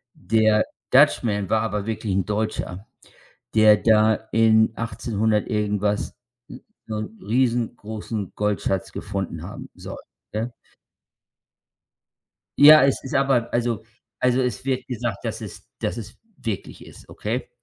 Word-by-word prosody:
Der 110 -1 +2 0.3
Dutch - - +6
Man 100 -4 -1
war 110 -1 +2
aber 105 -2 -2
wirklich 110 -3 -3
'n 95 - +1
Deutscher, 105 -1 -3 0.7
der 110 -1 +7
da 110 -1 +4 0.2
in 110 -1 +4
1800 110 -2 -1
irgendwas 105 -1 -1 0.4
s - - -10 0.3
so 110 -1 -3
'n 110 +1 -7
riesengroßen 110 -3 -2
Goldschatz 95 -2 -1
gefunden 95 -1 -4
haben - - -8
soll, - - -8 0.4
ne? 115 +3 -2 2.1
Ja, 150 0 +9
es 135 - 0
ist 135 - -7
aber 135 -4 +2
also 120 -2 0 0.4
also 125 +1 +2
es 125 +1 -2
wird 130 -1 -1
gesagt, 120 -4 -4
dass - - -4
es - - -10
dass - - -2
es 110 -1 -8 0.2
wirklich 110 -5 -6
ist, - - -15
okay? 115 +5 -4
110 Hz, 130 wpm, -23 LUFS, 105-120 Hz, 2.1 s, Ja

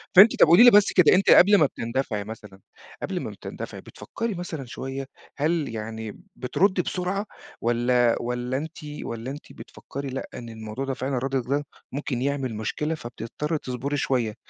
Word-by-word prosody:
فأنتِ 205 +5 +9
طَب - - +8
قولي 175 +8 +8
لي 245 - +10
بس 205 -1 +6
كده 180 -1 +6
أنتِ 195 - +2
قبل 205 +2 +8
ما 155 - +5
بتندفعي 115 -4 -2
مثلًا 105 -2 -10 0.4
قبل - - -2
ما - - -4
بتندفعي - - -8
بتفكّري 230 -1 -5
مثلًا 165 -6 -5
شوية، 135 +3 -5 0.3
هل 155 +1 0
يعني 110 0 -6 0.2
بتردّي 185 +8 +1
بسرعة 185 +4 -2 0.4
والَّا 120 0 +3
والَّا 125 +2 -2
أنتِ 160 +3 -6 0.3
والَّا 115 +3 -5
أنتِ 145 - -10
بتفكّري 140 0 -8
لأ، 135 +1 -5
إن 120 -1 -8
الموضوع 110 +3 -6
ده 135 - -2
فعلًا 130 +1 -2
ردِّك 130 -1 -2
ده 145 +1 0 0.3
ممكن 130 -2 -3
يعمل 135 -4 -1
مشكلة، 150 +9 -2
فبتضطّري 125 +5 -4
تصبري 130 +2 -3
شوية، 120 -6 0
135 Hz, 165 wpm, -25 LUFS, 120-155 Hz, 0.4 s, لي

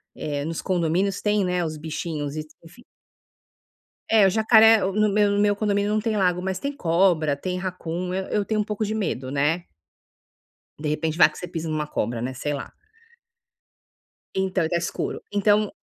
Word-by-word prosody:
eh, 145 -1 -3
nos 165 +1 -4
condomínios 185 +2 0
tem, 210 -1 +1
né, 180 -1 0
os 155 -1 -4
bichinhos 150 -1 -4
e 155 - -4 0.2
enfim. 170 +9 -16 1.3
É 220 -3 +5
o 190 - +5
jacaré, 220 +2 +6
no 210 +2 +1
meu 205 0 +3
no 200 - +1
meu 205 0 +3
condomínio 205 -1 0
não 215 0 +1
tem 220 0 -1
lago 180 -3 +2
mas 190 0 -3
tem 280 - -2
cobra, 170 - +2
tem 180 +5 -3
raccoon, 180 -1 -4
eu 190 0 -2
eu 210 - 0
tenho 215 +1 0
um - - 0
pouco 210 +1 -2
de 215 +1 -2
medo, 135 - -2
né. 150 +5 0 1.1
De 150 0 -3
repente 155 +1 -1
vai 165 - +7
que - - -13
você 180 - -6
pisa 165 -2 -4
numa 155 -1 -2
cobra, 115 -5 -2
né, 130 +2 -3
sei 145 +3 -3
lá. 140 - -6 1.6
Então 190 -3 0
tá 175 - 0
escuro, 170 0 -3
então 205 0 +3
180 Hz, 180 wpm, -24 LUFS, 160-205 Hz, 1.6 s, vai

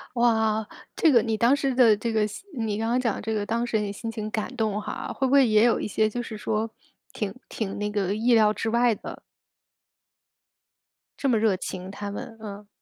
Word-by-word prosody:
哇， 220 -2 +2 0.3
这 325 - +4
个 240 -4 +6
你 225 -2 0
当 235 +5 +4
时 275 -2 0
的， 235 -4 +5
这 230 +2 -2
个 220 - +2 0.3
你 220 -4 -2
刚 225 +1 -1
刚 245 - +2
讲 230 -5 0
的 - - -6
这 220 +1 -2
个 210 -1 -1
当 235 +2 -1
事 235 - 0
人 210 - -1
的 - - -3
心 225 +3 -5
情 215 -2 -5
感 220 +3 -3
动 215 -3 0
哈， 210 - -5
会 270 - -1
不 260 - +1
会 275 -3 +6
也 215 +1 +5
有 235 - +3
一 - - -3
些 215 +1 +2
就 240 +3 -3
是 225 -2 -7
说， 220 +1 -1 0.4
挺 200 -3 -3 0.2
挺 200 -3 -4
那 210 0 -1
个 200 -2 -1
意 235 +2 +3
料 215 -1 +5
之 225 - -2
外 235 +1 +3
的？ - - -8 2.0
这 275 - 0
么 230 - +3
热 215 -3 +3
情， 185 0 -6
他 200 0 -6
们， 225 +2 -7
嗯。 205 -1 -8
220 Hz, 240 characters per minute, -25 LUFS, 210-235 Hz, 2.0 s, 个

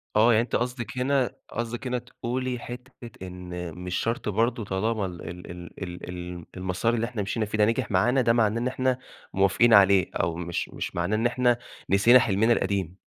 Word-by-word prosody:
آه، 115 +3 +6
يعني 110 - +4
أنتِ 120 - -3
قصدِك 125 0 -3
هنا 130 -1 +1
قصدِك 120 +3 -4
هنا 125 0 0
تقولي 125 +1 -4
حِتّة 125 0 -9 0.2
إن 90 -2 -7
مش 90 0 -4
شرْط 115 -2 -1
برضه 115 +2 0
طالما 100 +2 -1
ال 90 -2 -7
ال 90 0 -9
ال 85 0 -10
ال 90 0 -7
ال 90 -1 -7
المَسار 95 +5 0
اللي 115 0 0
إحنا 115 -3 -4
مشِينا 110 +3 -1
فيه 105 +1 -3
ده 105 - +5
نجح 115 -1 0
معانا 120 +8 +3
ده 115 -1 +3
معناه 115 0 +2
إن 125 - 0
إحنا 130 -1 0 0.4
موافقين 100 +5 +4
عليه؟ 100 -2 +6
أو 80 0 0
مش 85 0 -3
مش - - -5
معناه 90 +5 0
إن 115 - 0
إحنا 120 0 +3 0.3
نسينا 115 +6 +7
حلمنا 110 0 +3
القديم. 95 -5 -1
110 Hz, 195 wpm, -26 LUFS, 95-120 Hz, 0.4 s, نسينا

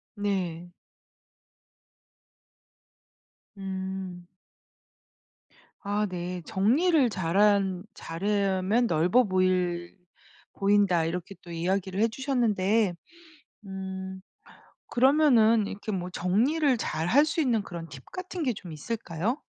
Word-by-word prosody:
네. 180 -4 -3 2.8
음. 190 -2 -5 1.6
아 205 0 0
네. 180 0 -4
"정리를 260 - +3
잘한 195 0 +2
잘하면 200 +5 0
넓어 180 +8 +3
보일 180 -2 0 0.6
보인다." 195 -4 +3
이렇게 180 +3 -4
또 175 - -11
이야기를 185 +3 -1
해 225 - +5
주셨는데 225 -6 +1 0.7
음 190 0 -6 0.7
그러면은 240 -5 +4
이렇게 205 +2 -5
뭐 180 -2 -3
정리를 250 - +1
잘할 175 - +2
수 310 +2 0
있는 240 -7 +2
그런 170 -4 -7
팁 135 -3 -11
같은 370 -2 -5
게 255 -4 +1
좀 185 -4 -10
있을까요? 205 - -3
195 Hz, 185 characters per minute, -27 LUFS, 180-230 Hz, 2.8 s, 해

